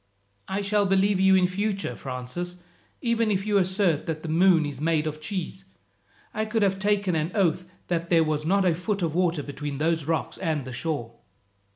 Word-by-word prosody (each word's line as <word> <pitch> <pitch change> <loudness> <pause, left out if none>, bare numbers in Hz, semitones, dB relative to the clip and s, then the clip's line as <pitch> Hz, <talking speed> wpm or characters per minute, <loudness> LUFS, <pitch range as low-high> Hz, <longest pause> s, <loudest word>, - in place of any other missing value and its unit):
"I 195 +1 -2
shall 205 0 +2
believe 195 0 +3
you 190 0 +5
in 185 -1 +4
future, 195 +2 -2
Francis, 130 +8 -5 0.5
even 230 -2 +1
if 195 -1 0
you 205 -1 +3
assert 185 -4 +1
that 155 -1 -3
the - - -5
moon 170 0 +4
is 145 -2 -5
made 160 -1 +1
of 155 0 -4
cheese. 190 +2 -4 0.7
I 215 - -1
could 220 0 0
have 195 -1 +1
taken 200 -3 +1
an 160 +2 -1
oath 180 -2 +1 0.2
that 170 -1 -2
there 165 -2 +5
was 155 -1 -1
not 190 +4 +2
a 175 - +4
foot 190 +3 -2
of 160 -2 0
water 175 -3 +1
between 145 0 -5
those 160 0 0
rocks 160 +1 -2
and 155 -6 -1
the 130 - -7
shore." 125 -3 -3
175 Hz, 195 wpm, -26 LUFS, 155-195 Hz, 0.7 s, you